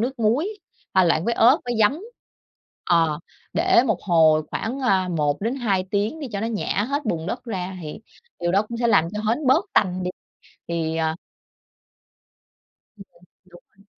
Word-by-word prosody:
nước 255 +3 -2
muối, 235 - +1 0.5
pha 190 - +5
loãng 165 0 +2
với 235 - 0
ớt 255 +8 +5
với 245 -1 -2
giấm. 245 +10 +3 0.9
Ờ, 165 -3 +3 0.3
để 235 - +4
một 215 -6 -1
hồi 160 -4 +4
khoảng, 255 +5 -3
à, 190 -8 +2
1 150 -4 0
đến 230 +5 -1
2 200 -7 0
tiếng 210 +10 -1
đi 280 - -5
cho 200 - -3
nó 225 - -1
nhả 210 -2 -1
hết 285 +1 -2
bùn 165 -8 -2
đất 245 +6 -4
ra 190 -4 -4
thì 150 +6 -7 0.4
điều 175 0 0
đó 200 +2 +4
cũng 235 - -5
sẽ 235 - +1
làm 165 -7 +3
cho 210 - -2
hến 260 +5 0
bớt 290 +9 +4
tanh 185 -2 +1
đi. 180 - -2 0.6
Thì, 165 -1 -2
à 160 0 0 1.8
Ừm, 200 - -11 0.4
đúng 175 -1 -17 0.2
rồi. 200 - -23
200 Hz, 180 wpm, -23 LUFS, 175-235 Hz, 1.8 s, pha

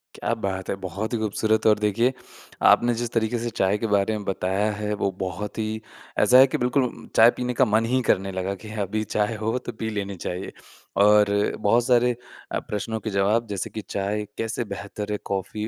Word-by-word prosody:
क्या 115 - -1
बात 95 -1 -3
है! - - 0
बहुत 100 +6 -4
ही 120 - +1
ख़ूबसूरत 110 +1 0
और 105 -1 +5
देखिए 110 +5 +2 0.6
आपने 120 0 +5
जिस 120 -1 -3
तरीक़े 115 +1 0
से 120 +1 -2
चाय 95 -1 +1
के 115 +1 -2
बारे 105 +1 +2
में 105 - -7
बताया 95 +2 0
है 105 0 -3
वो 100 - +2
बहुत 95 +4 -4
ही 110 0 -2 0.4
ऐसा 125 - +6
है 135 +1 +9
कि 155 - -2
बिल्कुल 125 0 -1
चाय 115 +1 +8
पीने 125 0 -2
का - - +7
मन 110 0 +2
ही 130 - +3
करने 95 +1 +2
लगा 95 +1 -2
कि 110 - -8 0.2
अभी 110 +3 -2
चाय 105 +1 +1
हो 110 +3 0
तो - - -2
पी 110 - -2
लेनी 100 -2 -3
चाहिए। 90 +1 -5 0.5
और 105 0 +6 0.3
बहुत 115 +4 +3
सारे 125 -1 +4 0.4
अ, - - 0
प्रश्नों 110 +2 -4
के 110 - -4
जवाब 105 +4 +1
जैसे 100 -2 -3
कि 110 - -6
चाय 100 +2 -2
कैसे 115 +2 -2
बेहतर 100 +1 -6
है 105 - 0
कॉफ़ी 105 +3 -2
105 Hz, 205 wpm, -24 LUFS, 100-115 Hz, 0.6 s, है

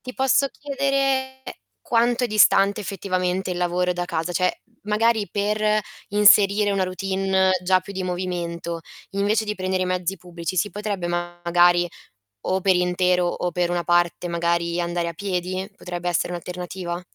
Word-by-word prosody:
Ti 255 -1 -8
posso 270 +1 +2
chiedere 275 -2 -1 0.4
quanto 240 +1 +1
è - - +2
distante, 205 -1 +4
effettivamente, 185 -1 -2
il 175 - -5
lavoro 180 0 0
da 175 0 -3
casa? 170 0 -3
Cioè 180 +1 0 0.2
magari 215 0 +1
per 210 +1 +1 0.3
inserire 205 0 +5
una 195 -1 +1
routine 190 0 0
già 185 +1 +4
più 190 +2 -10
di 190 - -4
movimento, 175 -2 -3 0.3
invece 205 +3 +1
di 210 0 -3
prendere 185 -1 -1
i - - -3
mezzi 185 +1 -1
pubblici 175 0 -6
si 205 +4 +1
potrebbe 200 -2 -3
magari, 175 0 +2 0.6
o 190 +1 0
per 190 0 +3
intero 180 0 +2
o 175 0 -2
per 175 -1 0
una 175 -1 -1
parte, 175 0 +1
magari, 170 0 0
andare 170 0 -1
a 170 - -4
piedi? 185 +1 -3
Potrebbe 175 -1 -6
essere 175 +1 0
un'alternativa? 180 0 -5
185 Hz, 155 wpm, -23 LUFS, 175-205 Hz, 0.6 s, inserire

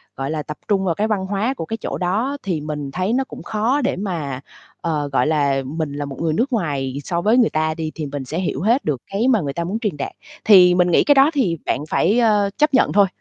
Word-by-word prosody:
gọi 135 +2 -3
là, 155 -1 -3
tập 150 - -7
trung 195 -2 +1
vào 170 -3 0
cái 215 +4 0
văn 200 -3 -1
hóa 205 +6 -1
của 210 - -6
cái 225 - -4
chỗ - - -4
đó 220 +11 -1
thì 175 -6 -2
mình 150 -2 -5
thấy 185 +7 -1
nó 265 +2 +2
cũng - - -11
khó 225 +7 0
để 265 - 0
mà, 160 -9 -4 0.4
ờ, 150 -3 -2
gọi 130 - +2
là, 140 -3 +1
mình 150 +1 -4
là 145 0 -4
một 140 +2 -8
người 160 -2 0
nước 250 - 0
ngoài 140 - -2
so 170 -1 -2
với 220 +5 +3
người 240 -3 +4
ta 155 0 0
đi 160 -1 -4
thì 155 - -4
mình 140 -1 -5
sẽ 155 +7 -4
hiểu 170 -6 -2
hết 235 +8 +2
được 140 -5 -1
cái 205 +5 -1
mà 235 -6 +3
người 140 -3 -3
ta 170 - -3
muốn 195 +6 -3
truyền 210 -9 -2
đạt. - - -4 0.3
Thì 185 -4 +7
mình 180 0 +3
nghĩ - - +4
cái 290 - +4
đó 275 +3 +5
thì 210 - +1
bạn - - 0
phải, 205 +8 +2
ơ, 210 -4 +3
chấp 300 -1 +2
nhận 260 - +3
thôi, 200 -1 +5
180 Hz, 270 wpm, -20 LUFS, 150-220 Hz, 0.4 s, Thì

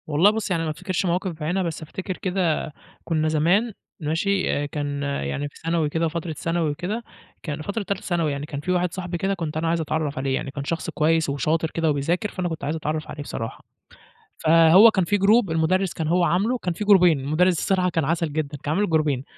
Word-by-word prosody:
والله 155 +6 +4
بُص، 215 -2 -3
يعني 165 -2 +1
ما 160 - -2
افتكرش 185 +4 -2
مواقف 180 +1 0
بعينها 165 +4 -2
بس 165 -2 -4
افتكر 185 +4 -6
كده 180 -5 -1 0.3
كنّا 155 -2 0
زمان 175 +9 +2 0.3
ماشي، 175 +5 0
آآ، 145 - -1
كان 145 -1 -3
يعني 140 - -2
في - - -28
ثانوي 165 -2 +1
كده 165 +2 0
فترة 165 0 -4
ثانوي 165 +1 -1
وكده، 190 +10 -4 0.4
كان 155 -1 -4
فترة 200 +6 -3
تالتة 200 +1 -3
ثانوي 170 -4 0
يعني 140 +1 -4
كان 145 -1 -6
في 165 +5 -2
واحد 180 -1 0
صحبي 180 -1 -4
كده 195 +3 0
كنت 165 -4 -4
أنا 165 +1 -1
عايز 165 0 +1
اتعرّف 155 -2 -2
عليه، 135 0 0
يعني 135 - -4
كان 140 0 -5
شخص 165 +3 -3
كويس 160 0 +1
وشاطر 155 +4 0
كده 165 -1 0
وبيذاكر، 165 +8 0
فأنا 185 -2 -2
كنت 160 -3 -6
عايز 150 +3 -1
اتعرّف 155 0 -3
عليه 150 - -7
بصراحة. 115 -5 -6 0.7
فهو 165 +7 +7
كان 190 -4 +1
في 205 +4 +1
جروب 200 -1 +4
المدرس 175 +4 +1
كان 160 - -3
هو 175 +2 +2
عامله 200 +9 +1
كان 180 -7 -3
في 190 - -4
جروبين 180 -7 +6
المدرس 160 +6 +2
الصرحة 185 -2 +1
كان 165 -4 0
عسل 165 0 -1
جدًا، 150 -1 -3
كان 150 - -1
عامل 205 0 +1
جروبين، 150 -5 +1
165 Hz, 215 wpm, -23 LUFS, 150-185 Hz, 0.7 s, فهو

